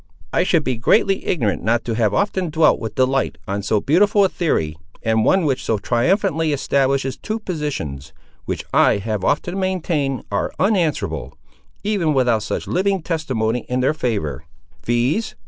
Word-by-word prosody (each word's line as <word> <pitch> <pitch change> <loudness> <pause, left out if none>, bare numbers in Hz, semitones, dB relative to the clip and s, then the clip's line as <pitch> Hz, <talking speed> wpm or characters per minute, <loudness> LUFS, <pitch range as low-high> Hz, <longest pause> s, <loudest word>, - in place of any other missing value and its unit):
"I - - +3
should 170 -3 +2
be 130 -4 -1
greatly 195 - +2
ignorant 115 - 0
not 115 +2 +1
to 115 - -2
have 110 -2 +1
often 190 - 0
dwelt 155 0 +3
with 110 -2 -5
delight 130 -8 +1
on 100 +1 -2
so 105 +1 +1
beautiful 200 - +3
a - - +1
theory, 80 - -1 0.3
and 110 -1 +2
one 190 - +3
which 135 -3 0
so 110 - 0
triumphantly 160 - +1
establishes 135 -1 0
two 215 - -3
positions, 145 - -4 0.3
which - - -4
I - - +4
have 105 -1 -3
often 175 - 0
maintained 160 - -1
are 100 - -1
unanswerable, 185 -6 0 0.5
even 190 -8 +1
without 120 -4 +2
such - - -3
living 190 -1 0
testimony 130 -9 -1
in 125 0 0
their 135 +4 +2
favour—viz. 120 - -2
135 Hz, 155 wpm, -20 LUFS, 110-180 Hz, 0.5 s, I